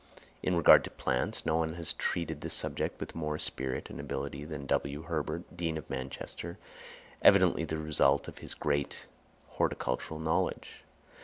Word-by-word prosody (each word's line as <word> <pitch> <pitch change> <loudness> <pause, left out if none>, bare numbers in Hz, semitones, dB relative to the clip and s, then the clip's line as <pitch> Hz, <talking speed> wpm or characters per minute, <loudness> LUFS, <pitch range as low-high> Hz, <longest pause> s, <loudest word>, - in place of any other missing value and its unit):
In 90 - +1
regard 85 - +8
to - - -6
plants, 65 - -1
no 80 0 +2
one 80 -1 0
has 85 -2 +1
treated 80 -3 -2
this - - +2
subject - - 0
with - - -6
more 75 -2 -2
spirit 65 -4 -1
and - - -7
ability 75 - -4
than 75 -3 -6
W. 70 +2 -1
Herbert, 80 0 -3
Dean 85 -2 -1
of 80 - -7
Manchester, 65 0 -5 0.6
evidently 85 - +6
the 80 0 -3
result 75 -2 +2
of - - -9
his - - -6
great 70 -1 -1 0.4
horticultural 75 +5 -2
knowledge. 80 0 -1
75 Hz, 155 wpm, -31 LUFS, 70-80 Hz, 0.6 s, regard